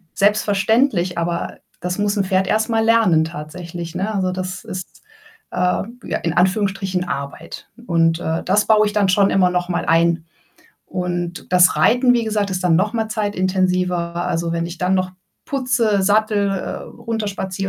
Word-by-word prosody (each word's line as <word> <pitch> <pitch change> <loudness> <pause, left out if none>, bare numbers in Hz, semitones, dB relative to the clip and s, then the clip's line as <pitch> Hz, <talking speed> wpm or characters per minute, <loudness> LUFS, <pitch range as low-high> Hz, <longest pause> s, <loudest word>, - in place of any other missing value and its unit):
selbstverständlich, 205 -1 +2
aber 170 0 -3 0.2
das 180 +3 -3
muss 205 0 0
'n 195 - +2
Pferd 190 0 +1
erst 220 +2 +1
mal 225 -1 +2
lernen 220 -9 +4
tatsächlich, 170 +2 -7
ne? 205 +4 -2
Also, 185 -2 0
das 185 0 -5
ist, 185 - -8 0.5
äh, - - -7 0.5
ja - - -1
in 165 -1 0
Anführungsstrichen 190 0 +1
Arbeit. 140 +3 -6 0.2
Und, 165 -1 +2
äh, 160 0 -2
das 205 +3 +2
baue 215 -1 +5
ich 205 - -4
dann 200 -3 +2
schon 195 +1 +4
immer 185 -2 +4
noch 180 0 -1
mal 175 - -1
ein. 165 0 +2 0.6
Und 175 -1 -4
das 180 0 +5
Reiten, 250 +1 +4
wie 235 -2 +1
gesagt, 210 -2 -1
ist 185 -1 -3
dann 165 -2 +4
noch 205 +5 +1
mal 225 -2 -1
zeitintensiver. 185 -4 0
Also, 170 -1 -1
wenn 170 0 -1
ich 175 - -8
dann 185 +1 +1
noch 185 0 -1 0.3
putze, 235 -8 +1
Sattel, 205 0 +2
äh, 195 - -3
runterspaziere 200 -4 -4
185 Hz, 165 wpm, -20 LUFS, 175-210 Hz, 0.6 s, baue